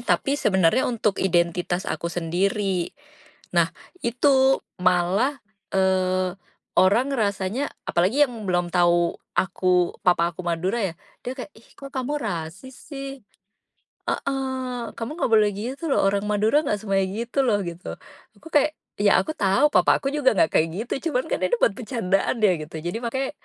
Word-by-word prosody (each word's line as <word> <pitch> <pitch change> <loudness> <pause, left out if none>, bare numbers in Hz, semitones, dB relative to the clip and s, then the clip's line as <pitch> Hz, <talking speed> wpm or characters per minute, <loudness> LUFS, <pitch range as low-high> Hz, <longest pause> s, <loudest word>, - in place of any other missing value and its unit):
tapi 275 +3 0
sebenarnya 190 +5 +3
untuk 215 -4 0
identitas 175 0 +1
aku 170 - -3
sendiri, 180 +2 -1 0.7
nah - - +4 0.4
itu 265 +2 +3 0.2
malah, 185 +10 +2 0.4
eee, 185 -1 +1 0.4
orang 210 +8 +4
rasanya 205 +3 -1 0.2
apalagi 190 +12 +2
yang 250 - -10
belum 175 -1 0
tahu 175 -1 +3 0.2
aku 185 -1 +1
papa 170 -1 +4
aku 185 - -7
Madura 175 +7 0
ya 180 -4 -2 0.3
dia 250 - -2
kayak, 255 - -6
"Ih, 225 - -19
kok 275 -1 -10
kamu 270 +3 -2
rasis 185 +6 -5
sih," 275 -1 -8 0.9
heeh, 260 -3 -2
"kamu 230 +3 -5
enggak 235 - 0
boleh 215 -1 +5
gitu 250 +9 -5
loh - - +3
orang 200 +1 0
Madura 215 +7 +3
nggak 210 - +2
semuanya 195 -2 +1 0.2
gitu 240 +4 -3
loh" 205 -3 +3
gitu 170 +1 -6 0.4
aku - - -14
kayak, 300 +1 +4 0.3
iya 205 -1 +5
aku 315 - -4
tahu 205 +7 +3
papa - - +4
aku - - 0
juga 260 -5 +3
enggak 160 - +3
kayak 160 - +2 0.2
gitu 290 +6 -3
cuman 255 -2 +1
kan - - 0
ini 240 - +2
buat - - +5
bercandaan 215 -5 0
ya 205 - +6
gitu 155 +2 -9
jadi 175 +5 -2
makanya, 265 +4 -2
205 Hz, 155 wpm, -24 LUFS, 180-255 Hz, 0.9 s, ya